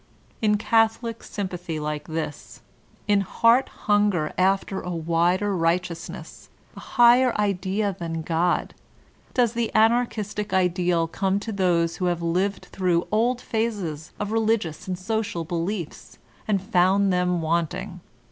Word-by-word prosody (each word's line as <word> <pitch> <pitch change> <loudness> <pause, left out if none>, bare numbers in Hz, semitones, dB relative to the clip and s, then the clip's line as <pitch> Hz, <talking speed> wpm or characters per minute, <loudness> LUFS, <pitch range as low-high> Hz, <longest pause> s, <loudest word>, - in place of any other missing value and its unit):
In 210 -1 +3
catholic 225 +1 +1
sympathy 180 -5 -5
like 150 0 -4
this, 160 -2 -6 0.5
in 205 -1 +3
heart 230 +6 +3 0.2
hunger 205 -7 +2
after 195 +1 +1
a - - -6
wider 175 +4 +1
righteousness, 170 0 -3 0.3
a - - -9
higher 240 0 +4
idea 200 0 0
than 165 -1 -4
God, 170 +2 0 0.6
does 240 -3 +3
the 235 -1 -1
Anarchistic 220 -3 +1
ideal 180 -2 +2
come 195 +3 0
to 225 - -5
those 175 -4 +1
who 185 - -2
have 175 -1 -1
lived 185 +4 -1
through 180 -2 +1
old 240 +3 +1
phases 200 -9 -3
of 210 0 -3
religious 220 -8 0
and 185 -1 -2
social 205 -2 -2
beliefs 170 +1 -4 0.3
and 205 -2 +2
'*found 190 +1 +3
them 180 -1 +1
wanting." 170 +3 -2
190 Hz, 130 wpm, -24 LUFS, 170-215 Hz, 0.6 s, higher